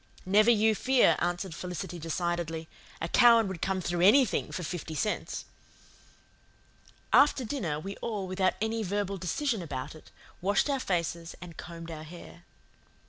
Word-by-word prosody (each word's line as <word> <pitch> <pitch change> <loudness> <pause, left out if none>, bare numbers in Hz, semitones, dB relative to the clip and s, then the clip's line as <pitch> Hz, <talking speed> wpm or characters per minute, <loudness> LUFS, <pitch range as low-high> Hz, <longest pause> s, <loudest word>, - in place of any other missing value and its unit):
"Never 210 +4 +5
you 220 -1 +4
fear," 255 +4 +4
answered 175 +1 -2
Felicity 180 +1 -6
decidedly. 165 0 -2 0.3
"A 165 - -1
Cowan 230 +2 +6
would 190 -3 -6
come 190 -1 0
through 175 0 -2
ANYTHING 225 +5 +4
for 180 - -4
fifty 160 -1 -5
cents." 210 +7 -2 1.7
After 280 -3 +5
dinner 185 - -2
we 195 +5 -6
all, 210 -4 -3
without 185 0 0
any 220 +1 -1
verbal 200 0 -2
decision 225 - -1
about 140 -4 -5
it, 155 - -15 0.3
washed 200 +9 +2
our 275 - 0
faces 170 -5 -2
and 175 -2 -10
combed 165 -1 -8
our 155 -1 -7
hair. 170 +1 -12
185 Hz, 145 wpm, -29 LUFS, 170-215 Hz, 1.7 s, Cowan